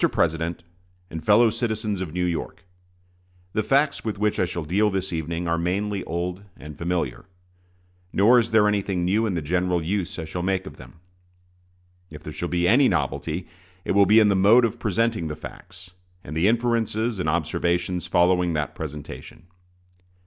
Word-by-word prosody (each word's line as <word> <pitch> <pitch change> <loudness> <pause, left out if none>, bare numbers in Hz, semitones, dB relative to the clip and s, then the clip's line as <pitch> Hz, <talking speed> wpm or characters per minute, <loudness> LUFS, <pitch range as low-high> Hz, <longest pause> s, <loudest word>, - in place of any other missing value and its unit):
PRESIDENT 85 +1 -1 0.5
AND 80 0 -6
FELLOW 110 +2 +5
CITIZENS 110 -3 -2
OF 90 -4 -4
NEW 90 +2 -1
YORK: 85 +1 -4 0.9
The 110 - +1
facts 140 +6 +1
with 110 -2 -3
which 105 +1 0
I - - +3
shall 85 -1 -4
deal 100 +7 +2
this 95 -2 -3
evening 85 +2 -3
are 85 0 0
mainly 95 +3 -1
old 90 +3 -3 0.2
and 75 +1 -10
familiar; 85 -5 -3 0.9
nor 115 +6 +5
is 115 0 -1
there 110 -2 +4
anything 100 -3 0
new 105 +5 +2
in 95 - -2
the 85 - -2
general 90 +3 0
use 90 +2 -3
I 80 - -4
shall 85 +3 -5
make 95 +1 -1
of - - -10
them. - - -13 1.2
If 75 -1 -11
there 80 - -7
shall 85 - -4
be 85 0 +1
any 130 +7 +5
novelty, 85 +3 -2 0.4
it - - -1
will 100 -1 +5
be 110 +3 +7
in 105 -2 +5
the 100 - +3
mode 105 +6 +6
of 115 - -3
presenting 110 -3 0
the 75 - -4
facts, 90 +4 -12 0.3
and 75 - -8
the 85 +5 +2
inferences 115 -1 0
and 80 -4 0
observations 85 +2 -1
following 90 0 +2
that 75 -1 -2
presentation. 75 - -8
90 Hz, 175 wpm, -24 LUFS, 85-105 Hz, 1.2 s, be